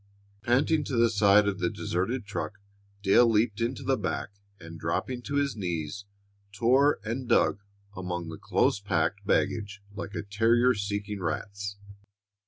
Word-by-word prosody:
Panting 140 Hz, +7 st, +2 dB
to 135 Hz, -, -3 dB
the 115 Hz, 0 st, +4 dB
side 105 Hz, -1 st, +5 dB
of 100 Hz, -1 st, -1 dB
the 90 Hz, -, +1 dB
deserted 105 Hz, +7 st, -2 dB
truck, 105 Hz, +1 st, -4 dB, 0.5 s
Dale 115 Hz, +4 st, +5 dB
leaped 110 Hz, 0 st, +1 dB
into 120 Hz, +3 st, -2 dB
the 135 Hz, -3 st, +1 dB
back, 100 Hz, -, -2 dB, 0.3 s
and, 85 Hz, -1 st, -10 dB
dropping 120 Hz, +10 st, -2 dB
to 140 Hz, +3 st, -5 dB
his 140 Hz, -3 st, +1 dB
knees, 85 Hz, -1 st, -4 dB, 0.5 s
tore 130 Hz, +7 st, +3 dB
and 120 Hz, +3 st, -4 dB
dug 105 Hz, -, +3 dB, 0.4 s
among 90 Hz, -2 st, -4 dB
the 80 Hz, -, -8 dB
close -, -, +1 dB
packed 100 Hz, 0 st, -1 dB
baggage 105 Hz, -3 st, 0 dB
like 100 Hz, 0 st, -6 dB
a -, -, -3 dB
terrier 115 Hz, +5 st, +3 dB
seeking 100 Hz, 0 st, -3 dB
rats. 100 Hz, +4 st, -4 dB
105 Hz, 150 wpm, -28 LUFS, 100-120 Hz, 0.5 s, side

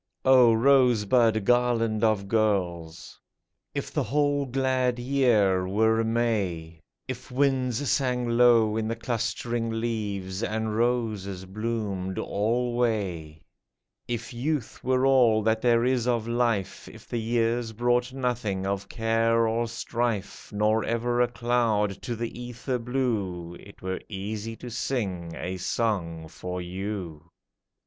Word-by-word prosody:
O 130 Hz, -3 st, +7 dB
Rosebud 115 Hz, -3 st, +4 dB
garland 115 Hz, -2 st, +2 dB
of 110 Hz, -3 st, +2 dB
girls! 90 Hz, -7 st, -1 dB, 0.6 s
If -, -, -3 dB
the -, -, +1 dB
whole 145 Hz, +2 st, +1 dB
glad 130 Hz, -1 st, +1 dB
year 120 Hz, -8 st, +2 dB
were 110 Hz, +3 st, +2 dB
May; 100 Hz, -8 st, -1 dB, 0.3 s
If 130 Hz, 0 st, -6 dB
winds 130 Hz, 0 st, +1 dB
sang 125 Hz, -3 st, +1 dB
low 115 Hz, -2 st, +4 dB
in 110 Hz, -1 st, -1 dB
the 115 Hz, -, -2 dB
clustering 115 Hz, 0 st, -2 dB
leaves, 105 Hz, -4 st, -3 dB
And 110 Hz, -1 st, -2 dB
roses 110 Hz, -6 st, -1 dB
bloomed 100 Hz, -2 st, -3 dB
alway; 105 Hz, -8 st, -1 dB, 0.6 s
If 120 Hz, 0 st, -4 dB
youth 135 Hz, +1 st, -3 dB
were 130 Hz, +1 st, +2 dB
all 120 Hz, -5 st, +4 dB
that 110 Hz, 0 st, +1 dB
there 120 Hz, -1 st, +3 dB
is 125 Hz, -2 st, +1 dB
of 120 Hz, -2 st, 0 dB
life; 115 Hz, -5 st, -1 dB
If -, -, -13 dB
the 120 Hz, -, -2 dB
years 115 Hz, 0 st, 0 dB
brought 120 Hz, +2 st, +1 dB
nothing 120 Hz, -7 st, -2 dB
of 100 Hz, 0 st, -3 dB
care 115 Hz, 0 st, +2 dB
or 115 Hz, +1 st, 0 dB
strife, 115 Hz, -3 st, -3 dB
Nor 105 Hz, +1 st, +2 dB
ever 120 Hz, +1 st, 0 dB
a 125 Hz, -, +4 dB
cloud 115 Hz, -4 st, 0 dB
to 120 Hz, -2 st, -4 dB
the 115 Hz, +1 st, -5 dB
ether 125 Hz, +1 st, -4 dB
blue, 110 Hz, -9 st, -2 dB
It 100 Hz, -, -15 dB
were 95 Hz, 0 st, -3 dB
easy 105 Hz, +2 st, -5 dB
to 125 Hz, +1 st, -9 dB
sing 95 Hz, -10 st, -3 dB
a 95 Hz, +1 st, -4 dB
song 90 Hz, -6 st, -2 dB
for 90 Hz, +3 st, -6 dB
you 90 Hz, -3 st, -5 dB
115 Hz, 125 wpm, -26 LUFS, 100-120 Hz, 0.6 s, O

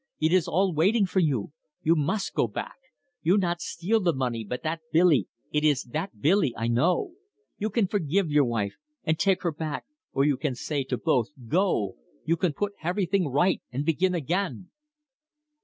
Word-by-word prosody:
It 160 Hz, +2 st, +2 dB
is 185 Hz, -3 st, +3 dB
all 190 Hz, +2 st, +2 dB
waiting 195 Hz, +7 st, +3 dB
for 190 Hz, +1 st, 0 dB
you. 145 Hz, -, 0 dB, 0.3 s
You 165 Hz, +2 st, +4 dB
mus' 165 Hz, +7 st, 0 dB
go -, -, +1 dB
back. -, -, -6 dB, 0.4 s
You 175 Hz, +5 st, +3 dB
not 175 Hz, -3 st, 0 dB
steal 195 Hz, +7 st, 0 dB
the 175 Hz, -6 st, +1 dB
money, 120 Hz, -4 st, -1 dB
but 125 Hz, +4 st, -5 dB
that 160 Hz, +1 st, -2 dB
Billy 165 Hz, -4 st, +4 dB, 0.2 s
it 150 Hz, 0 st, +1 dB
is 150 Hz, -4 st, +3 dB
that 150 Hz, -, -5 dB
Billy, 155 Hz, -, +3 dB
I 115 Hz, +1 st, -1 dB
know. 170 Hz, -, +2 dB, 0.5 s
You 215 Hz, -, -1 dB
can 220 Hz, 0 st, +2 dB
forgive 185 Hz, -2 st, 0 dB
your 145 Hz, -1 st, +4 dB
wife, 115 Hz, -4 st, -2 dB, 0.3 s
and 160 Hz, 0 st, 0 dB
take 195 Hz, -2 st, +2 dB
her 170 Hz, -, +1 dB
back, 155 Hz, -1 st, -4 dB, 0.3 s
or 135 Hz, -, +2 dB
you 145 Hz, -3 st, +2 dB
can 140 Hz, -3 st, -2 dB
say 140 Hz, +3 st, -2 dB
to 130 Hz, -1 st, -2 dB
both, 125 Hz, -7 st, +1 dB, 0.2 s
Go! 160 Hz, -, +1 dB, 0.3 s
You 165 Hz, -, +2 dB
can 170 Hz, -2 st, 0 dB
put 205 Hz, +7 st, -2 dB
heverything 180 Hz, +1 st, 0 dB
right 175 Hz, +8 st, +2 dB
and 135 Hz, +4 st, -2 dB
begin 180 Hz, +3 st, +2 dB
again." 180 Hz, +3 st, -2 dB
165 Hz, 185 wpm, -27 LUFS, 140-185 Hz, 0.5 s, You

